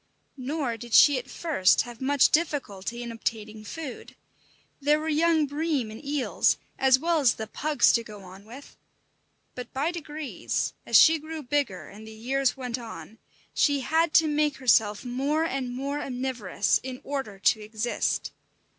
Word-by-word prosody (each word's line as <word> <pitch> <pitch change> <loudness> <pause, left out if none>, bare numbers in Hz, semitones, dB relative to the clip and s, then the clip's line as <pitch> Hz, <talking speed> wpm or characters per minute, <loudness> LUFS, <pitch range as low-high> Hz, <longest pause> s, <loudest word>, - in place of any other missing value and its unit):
Nor 260 -3 -2
did 235 0 -3
she 285 -3 +7
at 255 - -11
first 290 - +2
have 240 -1 -11
much 280 +1 +3
difficulty 240 - -1
in 235 - -6
obtaining 220 -1 -5
food. 275 +3 -8 0.7
There 295 +2 +3
were 310 - -5
young 320 0 +3
bream 290 -5 -2
and 220 - -10
eels, 285 -2 +1 0.2
as 265 -1 +5
well 330 +3 +1
as 260 -6 +3
the 220 - -5
"pugs" 295 +6 +2
to 230 - +2
go 210 -3 -11
on 190 +1 -13
with; 255 +6 -12 0.8
but 250 -1 -8
by 285 +6 0
degrees, 310 -4 -4
as - - +6
she 320 0 +7
grew 315 0 -7
bigger 275 -8 -2
and 215 +2 -12
the 220 - -10
years 265 +5 -1
went 250 -2 -4
on, 225 -1 -10 0.3
she 285 -2 +2
had 325 +4 +1
to 320 - +6
make 300 -1 +1
herself 225 -4 +2
more 275 +6 0
and 270 -5 -3
more 280 +4 -3
omnivorous 245 -7 -1
in 255 -1 -7
order 270 -8 -4
to 215 +3 +2
exist. 215 +2 -2
265 Hz, 165 wpm, -26 LUFS, 230-295 Hz, 0.8 s, she